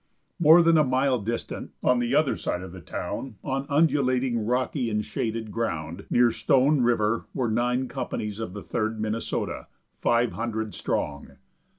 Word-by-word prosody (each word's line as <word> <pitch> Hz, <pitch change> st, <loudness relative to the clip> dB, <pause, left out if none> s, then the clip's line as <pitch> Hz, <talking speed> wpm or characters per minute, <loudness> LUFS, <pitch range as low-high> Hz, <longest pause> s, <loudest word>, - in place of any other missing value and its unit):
More 170 Hz, +1 st, +7 dB
than 165 Hz, -1 st, +5 dB
a -, -, +5 dB
mile 130 Hz, -1 st, +2 dB
distant, 115 Hz, +3 st, -5 dB
on 125 Hz, -1 st, +3 dB
the 120 Hz, +2 st, 0 dB
other 150 Hz, -2 st, +3 dB
side 90 Hz, -, -3 dB
of 95 Hz, -, -8 dB
the 90 Hz, 0 st, -10 dB
town, 120 Hz, -, -5 dB
on 135 Hz, 0 st, -2 dB
undulating, 135 Hz, -5 st, +2 dB
rocky 125 Hz, 0 st, 0 dB
and 105 Hz, -1 st, -1 dB
shaded 110 Hz, -1 st, -3 dB
ground, 85 Hz, -5 st, -3 dB
near 120 Hz, -1 st, +4 dB
Stone 135 Hz, +5 st, +3 dB
river, 115 Hz, -2 st, +1 dB
were 125 Hz, -5 st, 0 dB
nine 125 Hz, +3 st, +1 dB
companies 105 Hz, -3 st, -4 dB
of 110 Hz, -5 st, -5 dB
the 100 Hz, -, -7 dB
Third 110 Hz, -1 st, -2 dB
Minnesota, 110 Hz, +1 st, -3 dB, 0.3 s
five 120 Hz, 0 st, +2 dB
hundred 110 Hz, -2 st, -3 dB
strong. 70 Hz, -1 st, -3 dB
120 Hz, 160 wpm, -26 LUFS, 110-130 Hz, 0.3 s, More